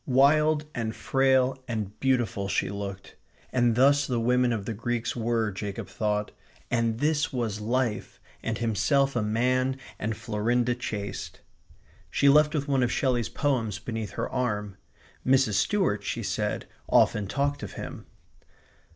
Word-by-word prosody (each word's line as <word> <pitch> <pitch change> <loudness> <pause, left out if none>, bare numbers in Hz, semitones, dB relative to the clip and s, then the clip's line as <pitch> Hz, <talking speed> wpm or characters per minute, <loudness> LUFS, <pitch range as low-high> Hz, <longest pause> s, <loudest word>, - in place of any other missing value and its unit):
Wild 150 +3 +4
and 110 -2 -3
frail 130 -1 +2
and 105 -3 -4
beautiful 120 -7 +1
she 95 - 0
looked, 100 -1 -7 0.4
and 120 -2 +3
thus 140 +3 +4
the 125 -3 0
women 125 +1 +2
of 110 -4 -2
the 115 - -3
Greeks 120 +2 -2
were, 115 -2 0
Jacob 100 +1 -5
thought; 105 0 -1 0.4
and 115 -2 +1
this 150 +1 +1
was 115 -5 -2
life; 120 0 -1 0.2
and 115 -1 -2
himself 135 +5 +1
a 120 - +2
man 130 +5 +1 0.2
and 110 0 -2
Florinda 120 +1 0
chaste. 105 -5 -5 0.7
She 140 - +3
left 150 +2 +5
with 145 -1 -1
one 135 -2 +2
of 120 -1 +2
Shelley's 120 -7 +1
poems 115 - 0
beneath 110 -3 -5
her - - -2
arm. 105 -6 -2 0.5
Mrs. 130 -4 +3
Stuart, 105 - +1
she - - -3
said, - - -2 0.2
often 105 -2 +3
talked 140 +6 -1
of 105 - -6
him. - - -8
120 Hz, 145 wpm, -27 LUFS, 105-130 Hz, 0.7 s, left